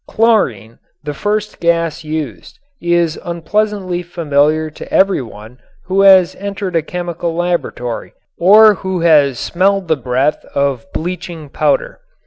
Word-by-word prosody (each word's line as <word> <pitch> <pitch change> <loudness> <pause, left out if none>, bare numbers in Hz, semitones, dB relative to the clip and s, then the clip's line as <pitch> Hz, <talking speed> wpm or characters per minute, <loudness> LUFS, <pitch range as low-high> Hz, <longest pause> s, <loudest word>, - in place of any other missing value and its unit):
Chlorine, 130 - 0 0.2
the 150 0 -4
first 210 +6 -3
gas 170 -1 0
used, 150 - -6 0.2
is 170 -2 +1
unpleasantly 185 +1 -2
familiar 155 -2 0
to - - -11
every 195 -5 +3
one 110 +1 -12 0.3
who 190 +1 +1
has 190 -3 +6
entered 200 -2 -5
a 165 - +3
chemical 175 0 -4
laboratory 170 -9 -3 0.3
or 210 +4 +7
who 190 -2 -4
has 145 -6 +4
smelled 195 +4 0
the 160 - +2
breath 130 +2 -1
of 140 +3 -1
bleaching 170 -3 -5
powder. - - -1
170 Hz, 125 wpm, -16 LUFS, 150-190 Hz, 0.3 s, or